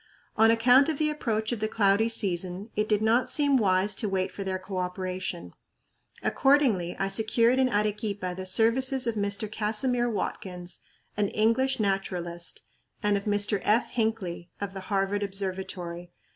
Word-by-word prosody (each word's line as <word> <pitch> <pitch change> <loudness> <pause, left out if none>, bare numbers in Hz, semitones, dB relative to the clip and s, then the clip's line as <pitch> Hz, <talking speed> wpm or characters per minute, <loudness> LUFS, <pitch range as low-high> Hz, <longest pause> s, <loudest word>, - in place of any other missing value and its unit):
On 220 +1 +5
account 245 +5 +5
of 310 - -1
the 305 0 +1
approach 220 -7 -2
of 240 - -2
the 215 - 0
cloudy 210 +1 +2
season 190 0 -1
it 210 0 0
did 210 0 +2
not 230 +3 +3
seem 285 -2 +2
wise 200 -3 +2
to 210 +2 -1
wait 190 0 -1
for 200 - -6
their 190 -1 -2
coöperation. 185 -1 -4 0.7
Accordingly, 260 - +2
I 195 - 0
secured 230 +4 +2
in 260 -1 +3
Arequipa 205 -3 -1
the 185 0 -5
services 255 +7 +2
of 230 - 0
Mr. 205 0 -1
Casimir 240 +3 0
Watkins, 180 -4 -4 0.4
an 205 -1 +2
English 230 +6 +1
naturalist, 180 -4 -3 0.4
and 205 0 +2
of 200 - -3
Mr. 205 0 +1
F. 220 +3 +1
Hinckley, 210 -7 -2
of 200 -1 -4
the 195 - -6
Harvard 200 0 0
Observatory. 185 -3 -4
205 Hz, 155 wpm, -27 LUFS, 190-230 Hz, 0.7 s, On